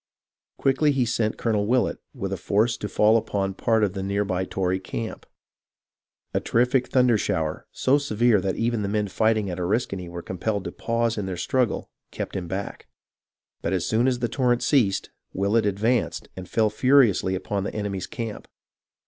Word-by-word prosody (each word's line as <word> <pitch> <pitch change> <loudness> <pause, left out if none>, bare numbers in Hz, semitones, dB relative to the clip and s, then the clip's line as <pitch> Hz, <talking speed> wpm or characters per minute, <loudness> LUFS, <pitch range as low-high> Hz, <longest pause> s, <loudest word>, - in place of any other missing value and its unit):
Quickly 140 +2 +3
he 135 -3 +1
sent 110 -1 0
Colonel 105 -3 0
Willett 125 +2 +1
with - - -4
a - - -2
force 110 +4 +1
to 105 - -5
fall 110 +2 +4
upon 100 -3 -1
a - - -8
part 110 +3 +1
of 100 -3 +1
the 95 - -4
near 100 +1 0
by 95 -1 -1
Tory 95 0 -1
camp. 110 +4 -6 1.1
A - - +2
terrific 125 +2 +2
thunder 125 -4 +3
shower, 80 -7 -2
so 140 +3 +2
severe 120 -6 +2
that 95 0 -1
even 115 -1 0
the 100 - -1
men 105 0 0
fighting 110 +1 +1
at 90 - -5
Oriskany 95 -1 -1
were 85 0 -7
compelled 100 +2 -2
to - - -5
pause 115 -1 -1
in 100 - -3
their 95 -2 -4
struggle, 125 +4 0 0.2
kept - - -5
him 90 -2 -3
back; 95 +3 -5 0.7
but 85 - -1
as 90 -1 0
soon 115 +3 +2
as 130 -1 +2
the 120 0 -1
torrent 120 0 +1
ceased, 110 -10 +2 0.2
Willett 100 +3 +2
advanced 110 +4 0
and 95 -1 -8
fell 110 -2 +2
furiously 125 -8 +4
upon 100 +1 -2
the - - -5
enemy's 100 -3 -3
camp. 115 -3 -6
105 Hz, 180 wpm, -25 LUFS, 95-120 Hz, 1.1 s, fall